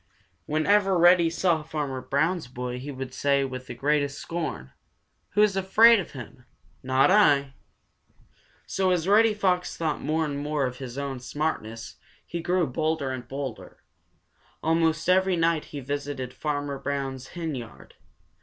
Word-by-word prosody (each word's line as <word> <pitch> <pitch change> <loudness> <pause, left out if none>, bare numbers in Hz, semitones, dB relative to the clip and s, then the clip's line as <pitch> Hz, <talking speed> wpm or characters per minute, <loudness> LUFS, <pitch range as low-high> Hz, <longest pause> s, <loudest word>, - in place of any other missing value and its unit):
Whenever 190 +5 +3
Reddy 175 0 +6
saw 170 -1 +1
Farmer 145 -4 -4
Brown's 155 +4 0
boy 125 0 -5
he 135 +3 -7
would 130 -2 -6
say 140 0 +1
with 130 -1 -7
the 120 - -7
greatest 145 +2 0
scorn: 160 - -5 0.6
"Who's 210 -1 +3
afraid 215 +4 +6
of 185 - -6
him? 125 -1 -10 0.4
Not 130 +5 +3
I!" 145 -10 +4 1.1
So 190 -1 0
as 180 -1 +1
Reddy 215 +2 +5
Fox 185 -3 0
thought 160 -2 -2
more 160 +1 0
and 140 -1 -3
more 145 -1 -1
of 125 0 -5
his 130 -1 -7
own 140 -2 -4
smartness, 115 -5 -4 0.3
he 170 - -5
grew 180 +1 +1
bolder 155 0 -1
and 125 -2 -6
bolder. 135 +1 -7 0.8
Almost 160 0 +1
every 190 0 +3
night 165 -2 +1
he 145 - -7
visited 140 -1 -4
Farmer 145 -2 -3
Brown's 135 -2 -4
henyard. 145 -9 -6
150 Hz, 145 wpm, -26 LUFS, 135-170 Hz, 1.1 s, Reddy